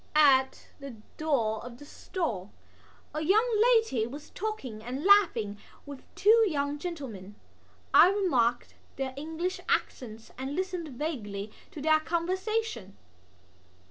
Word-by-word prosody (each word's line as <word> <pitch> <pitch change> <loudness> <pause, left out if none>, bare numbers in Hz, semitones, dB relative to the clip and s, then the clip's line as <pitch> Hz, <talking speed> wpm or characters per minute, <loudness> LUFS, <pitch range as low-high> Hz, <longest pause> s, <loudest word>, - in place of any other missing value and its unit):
At 265 -3 +4
the 275 -3 -8 0.2
door 240 -9 0
of 240 0 -9
the 290 - -12
stall 260 - -4 0.6
a 305 - -3
young 420 +9 +3
lady 450 - +3
was 290 +5 -10
talking 360 - -5
and 255 +6 -5
laughing 240 - +4 0.3
with 285 -2 -9
two 450 +3 +5
young 285 -2 -2
gentlemen. 250 - -7 0.6
I 355 - +8
remarked 260 - +1 0.2
their 265 -1 -3
English 320 +5 -4
accents 225 -3 -2
and 265 +2 -4
listened 365 -2 -3
vaguely 230 -8 -5 0.2
to 295 - -9
their 310 0 +4
conversation. 360 - -2
290 Hz, 120 wpm, -29 LUFS, 240-360 Hz, 0.6 s, I